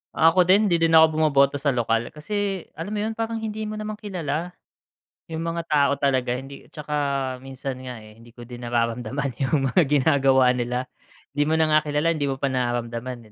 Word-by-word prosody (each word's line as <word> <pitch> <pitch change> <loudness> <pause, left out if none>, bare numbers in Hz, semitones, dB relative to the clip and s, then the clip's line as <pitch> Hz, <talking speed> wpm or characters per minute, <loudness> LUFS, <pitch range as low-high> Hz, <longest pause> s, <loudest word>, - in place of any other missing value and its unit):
Ako 165 +3 +5
din, 200 +3 +4
hindi 170 - +3
din 165 0 +2
ako 160 0 +8
bumoboto 140 -3 +3
sa 140 0 0
lokal, 115 -1 -1
kasi 195 +4 -3 0.2
alam 185 +6 -5
mo 210 - -1
'yun, 220 +1 -3
parang 225 0 -3
hindi 220 0 -4
mo 215 - -5
naman 215 0 -5
kilala, 175 -4 -4 0.8
'yung 160 - -3
mga 165 0 -3
tao 150 -3 +2
talaga. 130 -3 0
Hindi 135 +2 -9
'tsaka 150 0 -7 0.5
minsan 135 0 -6
nga, 125 -4 -8
eh, 110 +1 -16
hindi 115 +1 -17
ko 120 - -10
din 120 0 -10
nararamdaman 120 +3 -1
'yung 135 -1 +1
mga 180 - +4
ginagawa 135 -3 +4
nila. 125 0 -2 0.5
'Di 145 +1 0
mo 160 - +2
na 160 -1 +2
nga 155 - +6
kilala, 150 +3 +1
hindi 150 -3 -1
mo 135 - -1
pa 135 0 -2
nararamdaman, 120 -2 -3
140 Hz, 195 wpm, -24 LUFS, 125-165 Hz, 0.8 s, ako